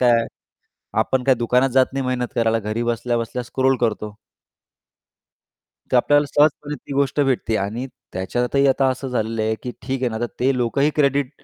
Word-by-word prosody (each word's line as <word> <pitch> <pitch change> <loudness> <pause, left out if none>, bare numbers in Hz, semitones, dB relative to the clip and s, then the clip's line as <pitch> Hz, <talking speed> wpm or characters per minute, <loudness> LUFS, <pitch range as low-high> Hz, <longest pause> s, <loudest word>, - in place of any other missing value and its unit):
काय 125 -1 +5
आहे, 115 - -3 0.7
आपण 130 -1 0
काय 135 -1 +5
दुकानात 125 +2 +2
जात 130 0 +3
नाही 135 -1 -2
मेहनत 125 -1 -1
करायला 115 -1 +2
घरी 110 +2 -3
बसल्या-बसल्या 120 +1 -1
स्क्रोल 130 +2 +1
करतो. 105 -2 -1 1.8
तर - - +5
आपल्याला 145 +4 +4
सहजपणे 150 0 +1
ती 140 - -10
गोष्ट 140 +1 +1
भेटते 125 -5 +1
आणि 110 +6 -3 0.3
त्याच्यातही 125 +9 0
आता 135 0 +3
असं 130 +1 -4
झालेलं 115 -2 -1
आहे, 110 0 +1
की 125 - -4
ठीक 130 +2 -3
आहे 125 - +2
ना, 110 - -4
तर 120 - -1
ते 130 +1 +2
लोकही 140 +5 +1
क्रेडिट 140 -2 +2
125 Hz, 175 wpm, -21 LUFS, 115-135 Hz, 1.8 s, काय